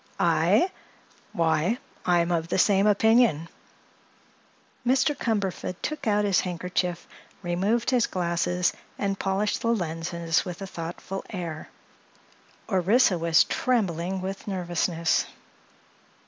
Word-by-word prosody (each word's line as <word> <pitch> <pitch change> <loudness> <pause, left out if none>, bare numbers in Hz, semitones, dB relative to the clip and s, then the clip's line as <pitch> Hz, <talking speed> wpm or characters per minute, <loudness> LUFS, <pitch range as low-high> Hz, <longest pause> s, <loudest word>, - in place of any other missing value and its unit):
"I? 370 - +3 0.6
Why, 165 +6 +1 0.3
I'm 175 -1 +3
of 165 -1 0
the - - -1
same 195 +1 +4
opinion." 215 -6 +3 1.3
Mr. 265 +4 +2
Cumberford 200 -6 -2
took 305 -5 -3
out 210 -1 +2
his 195 -3 +3
handkerchief, 180 0 -2 0.4
removed 200 +8 0
his 245 -2 +3
glasses 180 0 0 0.2
and 195 -1 -2
polished 195 +2 0
the - - -2
lenses 170 -5 -1
with 180 -1 -7
a 195 - -5
thoughtful 175 +2 -6
air. 170 -5 -6 1.0
Orissa 195 0 +3
was 165 0 +4
trembling 190 -6 -1
with 190 +2 -6
nervousness. 175 -3 0
185 Hz, 105 wpm, -26 LUFS, 170-210 Hz, 1.3 s, same